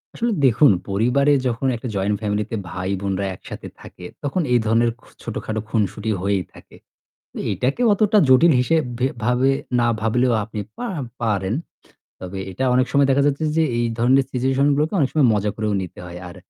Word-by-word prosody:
আসলে 235 0 -1
দেখুন 130 +2 +5 0.2
পরিবারে 125 +8 +2
যখন 125 +2 -1
একটা 120 +2 -6
জয়েন্ট 100 +1 0
ফ্যামিলি 105 0 -1
তে - - -1
ভাই 95 +2 -4
বোনরা 100 0 -2
একসাথে - - -9
থাকে 90 - -12 0.2
তখন 145 +6 -1
এই 120 - +5
ধরনের 115 +2 +2
খ - - -28 0.2
ছোটখাটো 110 0 -4
খুনসুটি 110 0 -1
হয়েই 100 -1 0
থাকে। - - -16 0.6
এ - - -3
এইটাকে 135 - -1
অতটা 210 +1 +3
জটিল 145 +6 +6
হিসেব 160 +5 +2 0.2
ভে 125 - +2 0.2
ভাবে 125 +3 +2 0.3
না 120 - +3
ভাবলেও 120 +2 +2
আপনি 110 0 -6 0.2
পা 245 - -4 0.4
পারেন। 100 -3 0 0.7
তবে 95 +1 -6
এটা 115 +9 -2
অনেক 130 +1 +3
সময় 140 -1 +4
দেখা 140 +1 +3
যাচ্ছে 145 +2 0
যে 165 - +4
এ - - -1
এই 120 - +1
ধরনের 130 +3 +4
সিচুয়েশন 135 +2 +1
গুলোকে 150 +6 0
অনেক 135 - +2
সময় 145 -5 +4
মজা 105 0 0
করেও 110 -1 -1
নিতে 90 - -9
হয়। 90 0 -8
আর 90 - -12
120 Hz, 185 wpm, -21 LUFS, 105-135 Hz, 0.7 s, জটিল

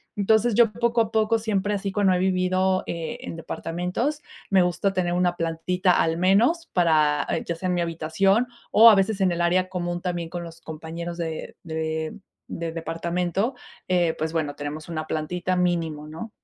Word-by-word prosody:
Entonces 220 +2 +2
yo 230 -3 +5
poco 235 +1 +1
a 220 -1 -1
poco 220 +1 +2
siempre 210 -2 -1
así, 195 0 -3
cuando 200 -2 +3
he - - +2
vivido, 185 0 +1
eh, 165 -1 -4
en - - -6
departamentos, 180 - -3 0.3
me 190 -2 +5
gusta 180 +3 0
tener 175 -2 0
una 175 0 +1
plantita 175 +2 +1
al 165 0 +1
menos 230 - +3
para, 155 -4 +3
eh, - - -1
ya 170 - -2
sea 185 +3 -4
en 180 - +1
mi 175 - 0
habitación 170 +7 +1 0.2
o 230 +2 +9
a 215 - +7
veces 195 +1 +1
en 185 -2 +3
el 170 - -1
área 185 +2 +2
común, 175 -1 -3
también 175 -2 -3
con 175 0 -5
los 165 0 -10
compañeros 165 +2 -6
de 160 -2 -5
de 160 0 -3 0.3
del 165 -1 -4
departamento, 175 - -2 0.3
eh, 175 -3 +2
pues 160 +1 -2
bueno, 150 -3 -2
tenemos 150 +2 -6
una 155 -1 -3
plantita 175 +4 -2
mínimo, 165 -4 -1
¿no? 165 +9 -7
180 Hz, 185 wpm, -24 LUFS, 165-195 Hz, 0.3 s, o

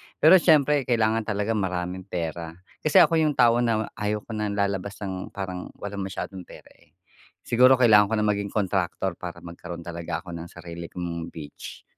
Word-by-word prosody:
pero 180 +4 +7
siyempre 150 -4 +3
kailangan 115 -2 +1
talaga 105 0 -1
maraming 90 -2 -2
pera 85 -2 -4 0.2
kasi 155 - +6
ako 165 - +2
yung 155 -2 +2
tao 120 0 +4
na 115 -3 0
ayaw 105 0 -1
ko - - -11
na 105 -1 -2
lalabas 100 -1 -2
ng 95 -1 -4
parang 95 -2 -5
walang 100 -1 -5
masyadong 95 -1 -7
pera, - - -14
eh. - - -26 0.5
Siguro 125 +2 +5
kailangan 110 -5 +6
ko 110 - -1
na 105 - +1
maging 100 0 -2
kontraktor 95 -3 -1
para 85 -1 -8
magkaroon 85 0 -8
talaga 85 0 -5
ako 90 - -9
ng 85 0 -7
sarili 85 0 -9
kong 85 -2 -5
beach. 75 -2 -9
100 Hz, 175 wpm, -25 LUFS, 85-110 Hz, 0.5 s, pero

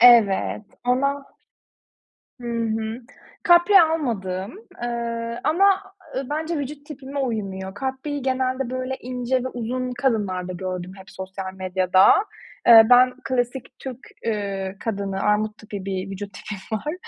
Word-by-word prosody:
Evet 225 -4 +6 0.2
ama 275 +3 +1 1.2
Hı 240 - -6
hı. 225 0 -2 0.4
Kapri 350 +2 +7
almadım. 225 - -1 0.3
Eee, 235 0 -3
ama, 390 +4 +3 0.2
eee, 265 - -1
bence 315 +2 -2
vücut 285 +1 -5
tipime 280 -1 -6
uymuyor. 195 -7 -3
Kapriyi 265 +5 -3
genelde, 260 -1 0
böyle, 255 +1 -3
ince 250 0 -1
ve - - -1
uzun 250 +1 -3
kadınlarda 205 -8 -1
gördüm 185 0 -4
hep 190 - -13
sosyal 190 0 -6
medyada. 185 0 +3 0.6
Eee, 225 -1 +10
ben 250 0 +7
klasik 255 0 -2
Türk, 260 -3 -6 0.3
eee, 200 -3 -2
kadını, 200 -3 -3
armut 210 0 +1
tipi 205 -3 -7
bir 190 0 -3
vücut 200 0 -6
tipim 205 +2 -5
var. 300 +8 -4
235 Hz, 125 wpm, -23 LUFS, 195-265 Hz, 1.2 s, Eee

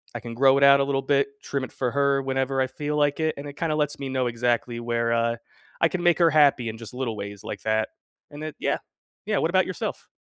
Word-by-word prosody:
I - - -2
can 120 -1 -7
grow 135 +3 +5
it 140 - +3
out 140 0 +8
a - - +3
little 135 -1 0
bit, 140 0 +2 0.2
trim 140 -2 -2
it - - -14
for 125 -2 -1
her 140 0 +2
whenever 135 0 0
I 130 - +1
feel 145 +3 -4
like 145 0 +2
it, 160 -1 0
and 140 - -7
it 145 - -10
kinda 160 -2 0
lets 150 -1 -1
me 140 - -4
know 130 -1 0
exactly 120 0 -1
where, 115 0 -1
uh, 115 0 +1 0.5
I 165 - +5
can 185 - -3
make 175 -1 +4
her 170 -1 +6
happy 140 -6 +4
in 110 - -7
just 115 0 -10
little 125 -4 -3
ways 100 0 -7
like - - -6
that, 110 0 +1 0.4
and 145 +1 -8
it 155 - -6
yeah. - - 0 0.5
Yeah, - - +1
what - - +1
about - - +3
yourself? - - -5
135 Hz, 260 wpm, -25 LUFS, 120-145 Hz, 0.5 s, out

